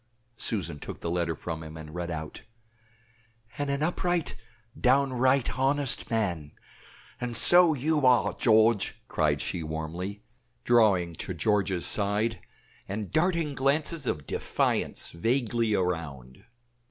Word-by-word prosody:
Susan 85 -9 -3
took - - -8
the 85 - -4
letter 85 -2 -1
from 80 +1 -6
him, 80 0 -9
and 75 -1 -10
read 85 0 -4
out 80 -2 -6 1.2
"And 145 -1 -1
an 140 +1 -1
upright, 175 0 -1 0.4
downright 130 -1 +2
honest 135 0 +1
man" 90 -10 -2 0.7
"AND 125 -2 -2
SO 175 -3 +6
YOU 150 +2 0
ARE, 125 -4 +4
GEORGE!" 110 -2 +3
cried - - 0
she, 85 - -3
warmly, 80 +6 -5 0.4
drawing 100 -8 +3
to 95 - -5
George's 95 0 0
side, 105 +2 +1 0.5
and 105 0 -5
darting 165 -2 +1
glances 140 +2 0
of 75 -2 -2
defiance - - -1
vaguely 115 +3 0
around. 80 - -4
110 Hz, 120 wpm, -27 LUFS, 85-135 Hz, 1.2 s, SO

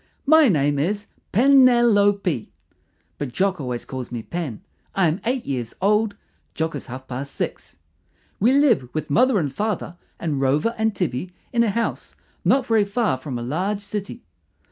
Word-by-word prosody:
My 315 +1 +6
name 145 - +2
is 205 +7 -1 0.3
PE 245 +8 +3
NEL 245 -4 +6
O 205 0 +5
PE, 180 - -3 0.7
but 145 -4 -3
Jock 190 +3 0
always 125 -2 -4
calls 130 -2 -6
me 120 -2 -4
Pen. 160 -9 -5 0.3
I 190 -3 +3
am 160 +6 -1
eight 250 +1 -1
years 125 -4 -4
old; 210 +2 +2 0.4
Jock 160 0 -1
is 145 - -6
half 130 +1 -8
past 135 +2 -5
six. - - -5 0.6
We 230 +6 +4
live 265 - +3
with 155 -1 -3
mother 250 - +4
and 145 -7 -1
father 205 -3 -3 0.2
and 150 -5 -2
Rover 145 - +2
and 220 -1 0
Tibby 175 +1 -2 0.2
in 235 -1 +4
a 230 - +1
house 230 +3 -3 0.3
not 270 -2 +3
very 225 -3 +3
far 205 - 0
from 130 -2 -5
a 120 - -5
large 185 +11 -2
city. 205 +3 -6
190 Hz, 175 wpm, -22 LUFS, 140-225 Hz, 0.7 s, My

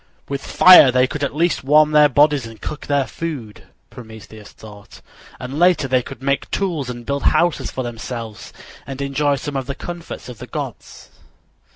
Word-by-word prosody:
"With 140 -1 -5
fire 180 -8 +7
they 125 0 +3
could 145 +3 -5
at 140 - -2
least 170 0 0
warm 150 +2 +4
their 150 -1 +5
bodies 145 -4 +2
and 115 -1 -13
cook 150 - -7
their 140 -2 +1
food," 125 -3 -7 0.3
Prometheus 110 -2 -12
thought, 105 -2 -14 0.4
"and 130 +4 -6
later 175 -5 +3
they 130 -1 +2
could 135 +1 -11
make 140 0 -1
tools 165 -10 -2
and 120 -1 -8
build 140 +2 -2
houses 175 -2 +1
for 130 - -5
themselves 115 -2 -7 0.4
and 135 -1 -7
enjoy 140 +1 0
some 145 +1 -6
of 135 -2 -3
the 140 - -4
comforts 175 +2 -8
of 125 -4 -10
the - - -9
gods." - - -8
140 Hz, 180 wpm, -19 LUFS, 125-150 Hz, 0.4 s, fire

